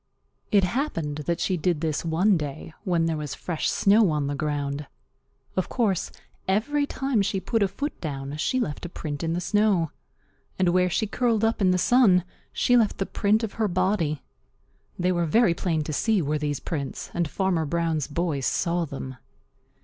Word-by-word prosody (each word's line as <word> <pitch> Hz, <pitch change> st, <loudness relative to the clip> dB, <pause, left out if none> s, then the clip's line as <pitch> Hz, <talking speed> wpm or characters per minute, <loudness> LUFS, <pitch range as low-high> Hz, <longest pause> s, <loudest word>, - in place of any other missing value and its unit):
It 200 Hz, -3 st, +5 dB
happened 180 Hz, -, -1 dB
that 170 Hz, -1 st, 0 dB
she 185 Hz, -, 0 dB
did 170 Hz, -2 st, 0 dB
this 155 Hz, -3 st, -1 dB
one 175 Hz, +5 st, +3 dB
day 150 Hz, 0 st, -5 dB
when 170 Hz, -3 st, +2 dB
there 165 Hz, -1 st, 0 dB
was 150 Hz, -2 st, -4 dB
fresh 170 Hz, -4 st, -2 dB
snow 205 Hz, 0 st, +4 dB
on 150 Hz, -2 st, 0 dB
the 140 Hz, -, -2 dB
ground. 145 Hz, -1 st, -2 dB, 0.7 s
Of 185 Hz, -, -1 dB
course, 210 Hz, -8 st, 0 dB, 0.4 s
every 285 Hz, +10 st, +1 dB
time 270 Hz, -6 st, 0 dB
she 195 Hz, 0 st, 0 dB
put 225 Hz, +3 st, -1 dB
a 200 Hz, -, +4 dB
foot 285 Hz, +10 st, -5 dB
down 140 Hz, -2 st, -4 dB
she 255 Hz, -, 0 dB
left 150 Hz, -, -3 dB
a 175 Hz, -, -4 dB
print 150 Hz, -4 st, -5 dB
in 165 Hz, 0 st, 0 dB
the 175 Hz, -, 0 dB
snow. 195 Hz, -4 st, +2 dB, 0.7 s
And 185 Hz, -2 st, +3 dB
where 180 Hz, +1 st, +3 dB
she 220 Hz, -, 0 dB
curled 225 Hz, 0 st, +1 dB
up 225 Hz, -1 st, 0 dB
in 190 Hz, -, +4 dB
the 180 Hz, -, +3 dB
sun 190 Hz, -3 st, +5 dB, 0.3 s
she 245 Hz, -, +2 dB
left 225 Hz, -4 st, +3 dB
the 195 Hz, -, -1 dB
print 215 Hz, +3 st, +1 dB
of 220 Hz, -, -3 dB
her 215 Hz, -, +3 dB
body. 185 Hz, -5 st, 0 dB, 0.7 s
They 180 Hz, 0 st, +1 dB
were 175 Hz, -2 st, +1 dB
very 220 Hz, +1 st, +4 dB
plain 165 Hz, -3 st, -1 dB
to 155 Hz, -, -4 dB
see, 220 Hz, +7 st, +2 dB
were 150 Hz, -2 st, 0 dB
these 145 Hz, -1 st, -2 dB
prints, 140 Hz, -5 st, -5 dB
and 170 Hz, -3 st, 0 dB
Farmer 180 Hz, -4 st, 0 dB
Brown's 165 Hz, -2 st, 0 dB
boy 155 Hz, -1 st, -1 dB
saw 170 Hz, +5 st, 0 dB
them. 130 Hz, -3 st, -7 dB
175 Hz, 190 wpm, -25 LUFS, 155-205 Hz, 0.7 s, It